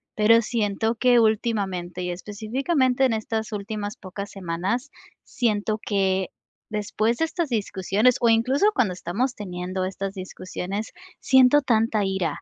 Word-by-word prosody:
pero 225 +2 +5
siento 220 0 0
que 245 +1 +4
últimamente, 200 -5 0
y 180 - -2
específicamente 250 - 0
en 250 - +2
estas 220 0 -3
últimas 210 0 -4
pocas 200 +1 -7
semanas, 195 - -3 0.3
siento 215 -2 -1
que 190 -2 +1 0.4
después 215 +2 -1
de 325 - +2
estas 325 -1 -3
discusiones, 210 +1 +1
o 235 - +4
incluso 255 - +3
cuando 210 - +2
estamos 200 +9 -2
teniendo 185 -1 -4
estas 195 +1 -4
discusiones, 185 +2 -5 0.3
siento 265 +1 +5
tanta 225 -4 +1
ira, 190 -5 -2
215 Hz, 130 wpm, -24 LUFS, 190-235 Hz, 0.4 s, pero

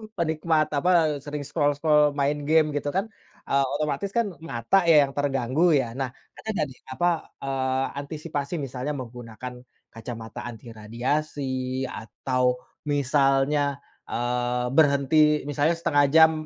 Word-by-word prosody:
penikmat 160 -2 +1
apa, 145 +4 +1 0.3
eee, - - -6
sering 145 -1 -5
scroll-scroll, 145 0 +2
main 145 +1 0
game 155 -1 +4
gitu 145 0 -2
kan, 195 - +1 0.4
eee, 140 0 +3
otomatis 150 +6 -2
kan 230 -4 +1
mata 160 +4 +1
ya 150 -3 +7
yang 135 - -3
terganggu 145 +4 +2
ya? 130 -5 +1
Nah, 135 -1 -1 0.3
ada - - -13
nggak 170 - 0
nih, 125 - -16
apa, 175 +7 +1 0.4
eee, 130 -1 0
antisipasi 145 0 -5
misalnya 135 +2 -4
menggunakan 125 -1 -8 0.4
kacamata 115 0 -7
anti 115 +1 -10
radiasi 130 +3 -2
atau 125 +2 -1 0.3
misalnya, 140 0 +2 0.3
eee, 125 0 -1
berhenti 150 +1 +4
misalnya 150 +3 +2
setengah 150 -4 +3
jam 160 0 +8
140 Hz, 130 wpm, -25 LUFS, 130-150 Hz, 0.4 s, jam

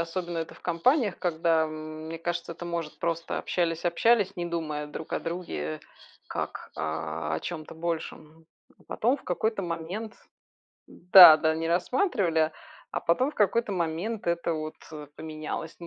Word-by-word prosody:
особенно, 170 0 -3
это 165 - -5
в - - -17
компаниях, 205 - +1
когда, 165 -2 +2
мне 155 +1 -7
кажется, 170 0 -3
это, 175 - -9
может, 170 -3 -4
просто 165 0 -2
общались-общались, 175 +5 +1
не 175 - -2
думая 155 -3 -3
друг 155 +1 -8
о - - 0
друге, 165 - -4 0.5
как - - -5
о 80 0 -3
о 80 - -2
чём-то 165 -2 -6
большем. 160 -1 -5 0.4
Потом, 245 +5 +1
в - - -17
какой-то 210 +3 -1
момент 180 +7 -5 0.8
Да-да, 160 -3 +8
не 165 0 -2
рассматривали, 175 - +1 0.4
а - - -1
потом, 255 - +2
в - - -22
какой-то 210 +1 +2
момент, 180 +5 -2
это 170 -1 0
вот, 155 0 -4 0.2
э, 150 -1 -8
поменялось. 155 +1 -6
Ну, 170 - -8
170 Hz, 145 wpm, -27 LUFS, 155-180 Hz, 0.8 s, Да-да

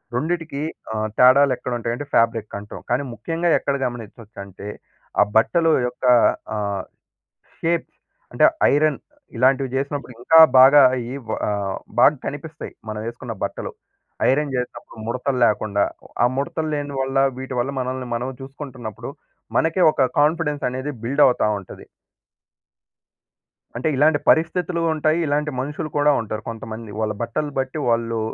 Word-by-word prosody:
రెండిటికి 160 +1 -2 0.3
ఆహ్, 110 0 -1
తేడాలెక్కడుంటాయంటే 125 -1 +3
ఫాబ్రిక్ 115 -2 +1
అంటం. 105 +1 -9
కానీ 125 +4 +1
ముఖ్యంగా 165 +6 -2
ఎక్కడ 140 - -1
గమనించొచ్చు 115 -2 -10
అంటే, 100 +1 -11 0.5
ఆ - - +8
బట్టలు 165 +8 +3 0.2
యొక్క 125 - -6 0.5
ఆహ్, 100 -2 -2 0.8
షేప్స్. 165 0 -1 0.4
అంటే - - +3 0.3
ఐరన్ 150 0 +2 0.4
ఇలాంటివి 130 +2 +3
చేసినప్పుడు 140 -1 -3
ఇంకా 160 +7 +5 0.2
బాగా 140 +2 +8 0.3
ఈ - - -5 0.4
ఆహ్, 100 -2 -2 0.3
బాగా 150 +4 +6
కనిపిస్తాయి. 150 +2 -7 0.2
మనం 105 0 -5
ఎసుకున్న 120 0 -8
బట్టలు. - - -5 0.6
ఐరన్ 140 +1 0
చేసినప్పుడు 125 -2 -6
ముడతలు 125 +3 -2
లేకుండా 105 -2 +1 0.4
ఆ - - +6
ముడతలు 155 +3 -2
లేని 145 -1 -4
వల్ల, 135 0 -1 0.2
వీటివల్ల 130 0 -2
మనల్ని 130 0 -4
మనం 125 +2 -2
చూసుకుంటున్నప్పుడు 135 -5 -8 0.5
మనకే 165 +3 +2
ఒక 130 - +2
కాన్ఫిడెన్స్ 150 -1 +1
అనేది 130 +3 -4
బిల్డ్ 140 +5 +2
అవుతా 125 -4 +2
ఉంటది. 95 - -12 1.9
అంటే, 125 +6 -1
ఇలాంటి 145 +2 +4
పరిస్థితులు 170 +2 +1
ఉంటాయి, 155 +1 +1
ఇలాంటి 150 +1 0
మనుషులు 150 +3 -4
కూడా 145 0 +4
ఉంటారు 110 -1 -5
కొంతమంది. 110 0 -8
వాళ్ళ 110 -1 0
బట్టలు 130 +6 -3
బట్టి 130 +3 -2
వాళ్ళు, 115 -1 0
130 Hz, 125 wpm, -22 LUFS, 115-150 Hz, 1.9 s, ఆ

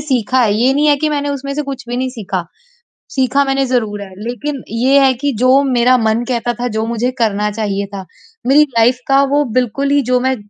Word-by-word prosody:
सीखा 260 -3 0
है। 215 -4 +3
ये 250 +5 +2
नहीं 295 +1 +2
है 290 -1 +4
कि 310 +2 -1
मैंने 290 -1 -1
उसमें 275 0 -4
से 300 - -2
कुछ 275 -3 -7
भी 245 - -3
नहीं 260 +1 -1
सीखा। 195 -7 -4 0.7
सीखा 265 +1 +1
मैंने 270 0 0
ज़रूर 220 -5 -1
है 195 -1 -9
लेकिन 245 +5 -5
ये 260 +5 +3
है 265 -1 +4
कि 285 -1 +1
जो 260 +2 +4
मेरा 255 -1 +3
मन 220 +1 0
कहता 240 -1 -1
था, 245 +2 -3
जो 220 -1 -2
मुझे 235 +2 -1
करना 210 -2 0
चाहिए 200 -2 -2
था, 190 -1 -6 0.4
मेरी 290 +3 +6
लाइफ़ 240 +2 +4
का 275 0 +4
वो 290 +1 +3
बिल्कुल 265 +3 0
ही 285 0 +3
जो 250 0 +3
मैं 260 +1 0
250 Hz, 225 wpm, -16 LUFS, 225-275 Hz, 0.7 s, मेरी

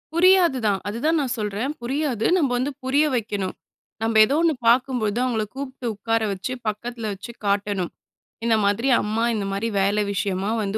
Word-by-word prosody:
புரியாது 355 -6 +5
தான். 195 -2 +1
அது 210 - -3
தான் 325 +1 +3
நான் 255 -3 -1
சொல்றேன். 210 +6 -2
புரியாது. 255 -3 -1
நம்ப 280 -7 +1
வந்து 270 +4 -1
புரிய 280 +4 +3
வைக்கணும். 205 -5 -2 0.5
நம்ப 225 0 0
ஏதோ 275 +6 0
ஒண்ணு 335 -2 +3
பார்க்கும் 250 +1 +3
போது, 215 +1 -1
அவங்கள 230 -4 0
கூப்ட்டு 265 -2 -6
உட்கார 225 +2 -1
வச்சு, 195 +7 -4
பக்கத்தில 225 +1 -3
வச்சு 200 +5 -9
காட்டணும். 200 -2 0 0.5
"இந்த 230 - +4
மாதிரி 215 +6 +1
அம்மா, 220 +2 -1
இந்த 200 -2 -2
மாதிரி 200 +4 -1
வேலை 205 +2 +2
விஷயமா 195 0 -1
வந்து, 200 +2 -2
225 Hz, 175 wpm, -23 LUFS, 205-260 Hz, 0.5 s, புரியாது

